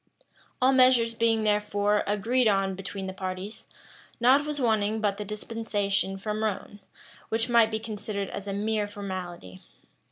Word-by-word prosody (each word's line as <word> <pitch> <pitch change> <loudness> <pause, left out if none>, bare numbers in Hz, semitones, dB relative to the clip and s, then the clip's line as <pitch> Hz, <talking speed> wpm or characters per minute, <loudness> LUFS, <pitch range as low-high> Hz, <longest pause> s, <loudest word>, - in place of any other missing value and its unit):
All 260 +1 +4
measures 255 -3 +5
being, 225 -1 +2
therefore, 210 0 +1
agreed 225 +5 +2
on 195 -2 +2
between 195 +1 -6
the 190 - -5
parties, 185 +3 -6 0.5
nought 260 +5 +5
was 300 -1 -3
wanting 220 -3 +1
but 205 -2 0
the 210 - -4
dispensation 205 -2 -2
from 210 +2 -3
Rome, 205 -1 -3 0.5
which 225 +2 0
might 235 -2 +5
be 220 0 -2
considered 210 -2 -5
as 200 - -6
a 200 - -2
mere 210 +1 -1
formality. 180 - -7
210 Hz, 150 wpm, -27 LUFS, 200-225 Hz, 0.5 s, measures